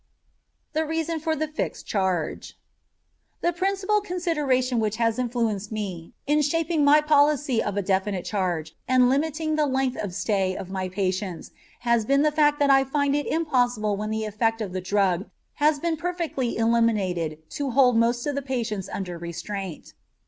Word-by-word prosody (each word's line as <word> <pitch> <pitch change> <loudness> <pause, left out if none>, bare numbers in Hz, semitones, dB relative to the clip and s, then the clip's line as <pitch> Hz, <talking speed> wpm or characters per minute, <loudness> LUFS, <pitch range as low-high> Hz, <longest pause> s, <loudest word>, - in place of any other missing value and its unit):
THE 315 +1 +1
REASON 325 +1 -2
FOR 320 0 -1
THE 310 +1 -1
FIXED 305 +1 -4
CHARGE 185 -6 -2 0.8
The 345 - +1
principal 390 +3 +1
consideration 300 - 0
which 215 -1 0
has 230 +1 0
influenced 230 -4 -1
me 190 -6 -5
in 295 +1 +3
shaping 320 +1 +1
my 290 +2 +6
policy 290 -4 +3
of 205 -1 -3
a 200 - 0
definite 190 0 0
charge 175 -6 -2
and 255 -1 +5
limiting 310 +2 0
the 300 -1 +2
length 265 -1 0
of 185 -4 -5
stay 190 -3 0
of 190 - -7
my 190 -1 -3
patients 185 -1 -3 0.3
has 235 -2 +2
been 275 +5 +3
the 305 - +3
fact 295 -1 +3
that 285 -1 +3
I 270 0 +6
find 280 +1 0
it 290 - -1
impossible 245 -9 +1
when 210 +1 -4
the 220 0 -2
effect 225 +2 0
of 200 -5 -4
the 185 - -2
drug 195 0 +1 0.3
has 300 0 +4
been 330 +2 -1
perfectly 335 -8 -2
eliminated 195 -9 +1
to 285 -2 -2
hold 250 -1 +4
most 235 +1 +2
of 290 - -1
the 280 - -2
patients 235 -7 -3
under 180 -3 -5
restraint. 175 +2 -6
240 Hz, 170 wpm, -25 LUFS, 200-295 Hz, 0.8 s, my